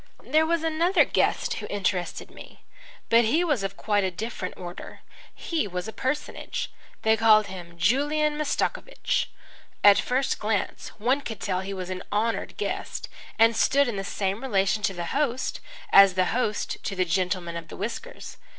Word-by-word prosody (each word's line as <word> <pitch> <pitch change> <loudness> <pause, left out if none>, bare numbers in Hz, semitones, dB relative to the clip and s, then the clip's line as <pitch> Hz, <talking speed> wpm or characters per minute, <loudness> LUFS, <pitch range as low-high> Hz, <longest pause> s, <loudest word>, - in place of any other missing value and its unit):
There 315 +1 +3
was 335 -1 +1
another 325 +4 +3
guest - - +1
who - - -6
interested 185 -3 -2
me. - - -14 0.5
But 230 +1 +6
he 310 +10 +2
was 295 - +1
of 195 0 -4
quite 205 -2 +1
a 190 - +1
different 190 0 -5
order. 175 -1 -9 0.3
He 325 -9 -2
was 180 0 -4
a 220 - -6
personage. 270 +3 -3 0.3
They 220 0 +4
called 220 -1 +5
him 175 -3 -9
Julian 295 - +2
Mastakovich. 305 - -1 0.5
At 205 -1 +8
first 260 +2 0
glance 210 -1 -2
one 250 +6 +1
could 225 -6 -6
tell 185 -2 -1
he 190 +1 -6
was 185 -1 -5
an 185 0 -4
honoured 225 +2 -1
guest - - -4 0.3
and 225 0 +5
stood 280 +4 +3
in 235 - -2
the 195 - -3
same 195 +1 -2
relation 210 -4 +1
to 195 - 0
the 175 -1 -4
host 265 -3 -1 0.3
as 195 -2 +8
the 185 -1 +3
host 225 -4 -1
to 195 - -3
the 185 -1 +1
gentleman 180 -1 -1
of 170 -1 -6
the - - -10
whiskers. 235 - -6
215 Hz, 170 wpm, -26 LUFS, 190-270 Hz, 0.5 s, At